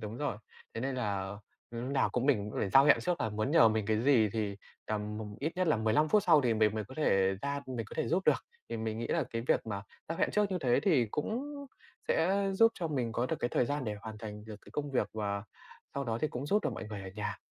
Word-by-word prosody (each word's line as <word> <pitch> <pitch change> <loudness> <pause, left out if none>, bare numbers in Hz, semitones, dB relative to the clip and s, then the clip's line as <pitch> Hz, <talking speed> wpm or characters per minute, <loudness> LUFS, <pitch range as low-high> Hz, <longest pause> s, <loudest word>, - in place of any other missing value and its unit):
đúng 110 0 -6
rồi, 145 -5 -2 0.4
thế - - -3
nên 135 +2 -2
là 100 -5 -2 0.3
lúc 120 +2 -4
nào 135 - +3
cũng 125 +1 -1
mình 105 -8 +2
cũng - - -3
phải - - 0
giao 135 +5 +7
hẹn 145 - +6
trước 180 -1 -1
là 110 - +1
muốn 110 +5 -1
nhờ 160 -7 +7
mình 110 -2 -1
cái 110 0 +1
gì 120 -6 +5
thì 105 -3 -2 0.3
tầm, 105 0 -3
ừm, 105 -1 -6
ít 155 +4 -1
nhất 185 - +1
là 155 - +4
15 110 +8 +2
phút 210 +5 +4
sau 160 -5 +6
thì 120 -4 +2
mình 110 -1 +3
mới 110 -1 -2
có 130 - -12
thể 95 -10 +3
ra 140 0 -2
mình 120 -4 -4
có - - -10
thể - - 0
giúp 180 +4 +1
được. - - +3 0.2
Thì - - -3
mình 110 0 -3
nghĩ 115 - -2
là - - +1
cái 115 0 -3
việc - - +2
mà 100 -3 -3 0.3
giao 165 - -3
hẹn - - +2
trước 210 -1 +1
như 185 - 0
thế 125 -2 +3
thì 145 - +3
cũng 220 - -2 0.6
sẽ 165 +3 +2 0.2
giúp 225 +4 +5
cho 170 -3 -3
mình 125 -6 -1
có 120 +2 0
được - - -1
cái 120 - +1
thời - - +2
gian 145 -1 -2
để 105 - -2
hoàn 110 -1 -7
thành 105 -1 -7
được 110 -1 -8
cái - - -16
công 145 -1 -3
việc 130 - +1
và 100 -2 -2 0.5
sau 140 - -2
đó 115 -2 -2
thì 155 - +1
cũng 130 +1 -5
giúp 210 +7 +2
được - - 0
mọi - - -6
người 105 -2 -6
ở 95 - -7
nhà. 105 0 -3
115 Hz, 280 wpm, -32 LUFS, 105-145 Hz, 0.6 s, giao